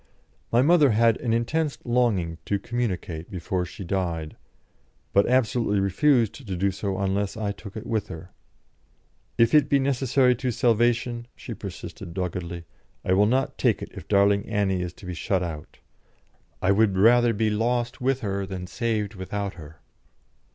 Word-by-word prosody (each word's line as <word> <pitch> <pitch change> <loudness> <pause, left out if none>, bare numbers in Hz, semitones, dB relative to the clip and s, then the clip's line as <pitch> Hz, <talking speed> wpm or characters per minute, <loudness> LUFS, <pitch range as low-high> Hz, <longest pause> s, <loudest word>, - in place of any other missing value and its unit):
My 120 +2 +4
mother 155 -2 +5
had 115 +1 +4
an 120 - -2
intense 145 +7 0
longing 110 -10 +1
to 100 - 0
communicate 95 -8 -3
before 90 0 -2
she 95 - -9
died, 85 -4 -2 0.8
but 100 - +4
absolutely 120 -4 +2
refused 115 +4 +2
to 100 -6 -4
do 100 +2 +1
so 95 0 -3
unless 100 +1 -1
I 105 -2 -1
took 100 +1 -9
it 110 - -7
with 110 -3 -1
her. 85 +1 -9 1.1
"If 115 -1 +4
it 150 -3 +5
be 140 - +4
necessary 135 -1 +2
to 130 0 -2
salvation," 120 0 +1
she - - -7
persisted, 85 - -8
doggedly, 85 -2 -4 0.4
"I 95 - +2
will 100 +2 +4
not 130 +4 0
take - - +2
it - - -9
if - - -10
darling 100 0 +3
Annie 100 -4 0
is 90 -1 -4
to 95 - -14
be 90 - -4
shut 90 +2 -1
out. 80 -3 -7 0.9
I 95 - +4
would 100 -1 +3
rather 120 +4 +5
be 110 0 0
lost 120 +3 -1
with 135 +1 +1
her 100 -2 -2
than 95 -2 -5
saved 110 +1 -2
without 100 +1 -4
her." 80 -3 -13
105 Hz, 165 wpm, -25 LUFS, 95-120 Hz, 1.1 s, mother